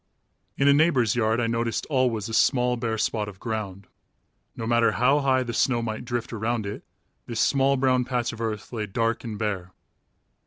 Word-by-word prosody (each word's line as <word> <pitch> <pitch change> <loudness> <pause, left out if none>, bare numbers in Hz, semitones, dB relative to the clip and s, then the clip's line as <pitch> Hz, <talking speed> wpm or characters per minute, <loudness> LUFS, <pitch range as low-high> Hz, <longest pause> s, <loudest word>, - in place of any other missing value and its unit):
In 140 - +2
a 140 - +7
neighbor's 140 -7 +3
yard 110 -1 +1
I 120 - +1
noticed 115 0 -1
always 125 -7 0
a 115 - -7
small 125 +2 +3
bare 115 -2 -2
spot 105 -1 -1
of 95 -2 -13
ground. 105 -4 -4 0.7
No 115 - -5
matter 120 0 +3
how 135 +5 +3
high 130 -2 +2
the 120 -1 -5
snow 120 0 +1
might 110 +1 -4
drift 120 -1 -3
around 115 0 -2
it, 100 +1 -6 0.4
this 115 -2 -4
small 135 0 +3
brown 130 -1 +2
patch 125 -1 -2
of 115 - -8
earth 110 0 -4
lay 110 -3 -3
dark 115 +3 -1
and 110 -3 -5
bare. 95 -4 -3
115 Hz, 190 wpm, -25 LUFS, 110-125 Hz, 0.7 s, a